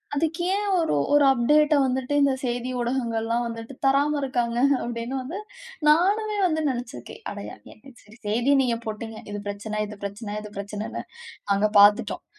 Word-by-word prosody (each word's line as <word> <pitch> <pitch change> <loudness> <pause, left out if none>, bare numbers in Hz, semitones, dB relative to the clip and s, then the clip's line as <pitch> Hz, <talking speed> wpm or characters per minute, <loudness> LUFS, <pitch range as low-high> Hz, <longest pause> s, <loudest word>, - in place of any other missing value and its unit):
"அதுக்கு 325 +3 -1
ஏன் 410 0 -1
ஒரு 325 - +1 0.2
ஒரு 290 -1 +6
அப்டேட்ட 295 +5 +4
வந்துட்டு, 260 +1 -1
இந்த 280 -1 +4
செய்தி 245 0 -2
ஊடகங்கள்லாம் 235 -1 -1
வந்துட்டு 230 +2 -7
தராம 280 +2 +3
இருக்காங்க?" 240 -3 -1 0.3
அப்படின்னு 235 +2 -4
வந்து 310 +10 -6 0.5
நானுமே 410 +7 +3
வந்து 315 -2 0
நெனைச்சிருக்கறேன். 240 - -6
அட 205 - -7 0.3
ஏ - - -22 0.3
சரி 210 +3 -17
செய்தி 235 +6 +1
நீங்க 235 -2 0
போட்டீங்க. 220 +1 -5
இது 205 - -4
பிரச்சனை 210 +1 -4
இது 210 0 -9
பிரச்சனை 205 +1 -5
இது 210 0 -10
பிரச்சனைன்னு 205 +1 -5 0.5
நாங்க 200 +1 +3
பார்த்துட்டோம். 205 +1 +4
240 Hz, 150 wpm, -25 LUFS, 215-280 Hz, 0.5 s, ஒரு